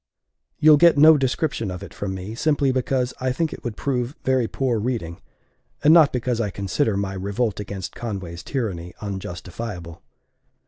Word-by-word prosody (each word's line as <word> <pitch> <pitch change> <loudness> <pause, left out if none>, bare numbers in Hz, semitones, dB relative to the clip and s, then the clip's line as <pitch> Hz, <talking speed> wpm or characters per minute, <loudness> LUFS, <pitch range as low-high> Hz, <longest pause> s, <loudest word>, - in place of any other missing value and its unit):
You'll 155 -1 +7
get 170 0 +6
no 155 +2 +8
description 135 -4 -1
of 90 +1 -6
it - - -10
from 95 -2 -4
me, 95 +3 -6
simply 145 +1 +1
because 130 0 0
I 130 0 +1
think 160 +4 -1
it - - -10
would 120 -4 -5
prove 130 0 -2
very 130 -3 +2
poor 125 -3 -1
reading, 105 -8 -3 0.6
and 150 - +7
not 160 -4 +7
because 125 -1 -1
I 105 - -1
consider 100 +4 -1
my 100 -1 -2
revolt 100 +3 -2
against 95 -4 -6
Conway's 95 -7 -5
tyranny 95 - -4
unjustifiable. 90 -2 -6
115 Hz, 165 wpm, -23 LUFS, 95-130 Hz, 0.6 s, no